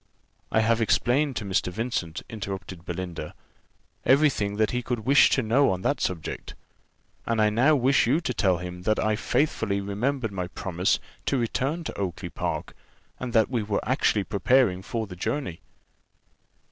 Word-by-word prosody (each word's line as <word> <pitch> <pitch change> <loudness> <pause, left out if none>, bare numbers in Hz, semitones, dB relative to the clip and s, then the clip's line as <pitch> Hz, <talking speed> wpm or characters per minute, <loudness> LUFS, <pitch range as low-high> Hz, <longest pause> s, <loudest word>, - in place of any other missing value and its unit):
"I 110 - +3
have 115 +1 +2
explained 130 +5 +2
to 105 - -3
Mr. 95 -1 0
Vincent," 100 -6 -3
interrupted 95 -4 -6
Belinda, 90 0 -5 0.7
"every 145 +3 +5
thing 100 -4 -2
that 110 0 +1
he 125 - -1
could 120 -1 -3
wish 135 +6 +6
to 130 - +2
know 120 +6 +3
on 95 0 -2
that 145 - 0
subject, 85 -4 -4 0.7
and 115 -1 +1
I 105 0 +4
now 130 +8 +4
wish 135 -1 +3
you 140 +7 +3
to 145 -7 -2
tell 95 -6 +2
him 90 +1 -7
that 110 +4 +1
I 110 0 +1
faithfully 110 -6 0
remembered 110 +5 -2
my 90 -2 -3
promise 90 0 0 0.3
to 140 - +2
return 135 +7 -1
to - - -6
Oakly 95 -4 -3
park, - - -4 0.5
and 125 -1 -4
that 110 +1 +3
we 120 -3 +1
were 105 0 -2
actually 110 -5 +2
preparing 105 -1 +2
for 110 +3 -3
the 95 -3 -9
journey." 110 - -3
110 Hz, 170 wpm, -26 LUFS, 95-130 Hz, 0.7 s, wish